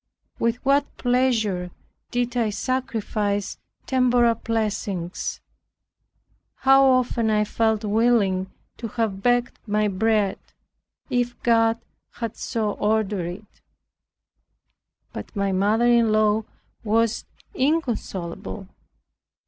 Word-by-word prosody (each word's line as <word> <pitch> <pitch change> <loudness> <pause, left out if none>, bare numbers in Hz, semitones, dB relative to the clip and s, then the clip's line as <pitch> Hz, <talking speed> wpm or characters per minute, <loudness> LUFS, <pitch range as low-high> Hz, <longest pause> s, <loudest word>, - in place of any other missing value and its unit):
With 230 0 +1
what 280 +1 +2
pleasure 230 -8 +1 0.4
did 245 0 -1
I 230 -3 +1
sacrifice 210 -4 -2 0.3
temporal 245 -2 +3
blessings. 210 -6 -3 1.2
How 270 0 +6
often 250 -3 +2
I 210 -1 +3
felt 220 0 0
willing 205 -4 +2 0.3
to 230 - -5
have 215 -3 -2
begged 245 +2 +1
my 210 0 +1
bread, 210 0 +1 0.7
if 245 -1 0
God 225 -1 +3 0.3
had 230 -2 -5
so 220 -4 -2
ordered 210 -4 0
it. 185 +5 -10 1.5
But - - -8
my 200 -1 0
mother 205 +5 +2
in 235 -2 +4
law 215 0 +2 0.4
was 225 +1 +1 0.3
inconsolable. 215 - -2
225 Hz, 95 wpm, -24 LUFS, 205-240 Hz, 1.5 s, How